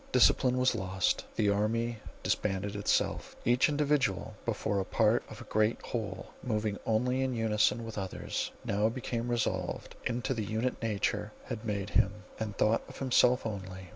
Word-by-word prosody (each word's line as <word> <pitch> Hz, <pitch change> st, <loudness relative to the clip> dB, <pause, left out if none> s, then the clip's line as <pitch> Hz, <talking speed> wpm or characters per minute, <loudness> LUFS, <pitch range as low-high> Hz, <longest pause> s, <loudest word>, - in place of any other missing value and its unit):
Discipline 125 Hz, -1 st, +5 dB
was 130 Hz, 0 st, +3 dB
lost; 95 Hz, 0 st, 0 dB
the 105 Hz, -2 st, +3 dB
army 115 Hz, +3 st, 0 dB, 0.2 s
disbanded 100 Hz, 0 st, 0 dB
itself. 100 Hz, -, 0 dB
Each 120 Hz, +4 st, +4 dB
individual, 145 Hz, -9 st, +1 dB
before 105 Hz, -3 st, 0 dB
a -, -, +1 dB
part -, -, +2 dB
of -, -, -9 dB
a -, -, -7 dB
great 110 Hz, +1 st, +1 dB
whole 100 Hz, -5 st, -4 dB
moving 110 Hz, -4 st, -1 dB
only 125 Hz, +4 st, +2 dB
in 130 Hz, -1 st, 0 dB
unison 115 Hz, 0 st, +2 dB
with 110 Hz, -2 st, -5 dB
others, 95 Hz, -2 st, -3 dB, 0.2 s
now 105 Hz, +2 st, +2 dB
became 120 Hz, 0 st, -3 dB
resolved 120 Hz, -2 st, -1 dB
into 125 Hz, +2 st, -1 dB
the 115 Hz, -3 st, -2 dB
unit 110 Hz, +5 st, -1 dB
nature 110 Hz, -3 st, -1 dB
had 110 Hz, -, -5 dB
made 100 Hz, -2 st, -2 dB
him, 100 Hz, +2 st, +2 dB, 0.2 s
and 105 Hz, -3 st, -4 dB
thought 110 Hz, +2 st, +3 dB
of -, -, -10 dB
himself 125 Hz, -1 st, +4 dB
only. 95 Hz, -3 st, -5 dB
110 Hz, 160 wpm, -31 LUFS, 100-120 Hz, 0.2 s, Discipline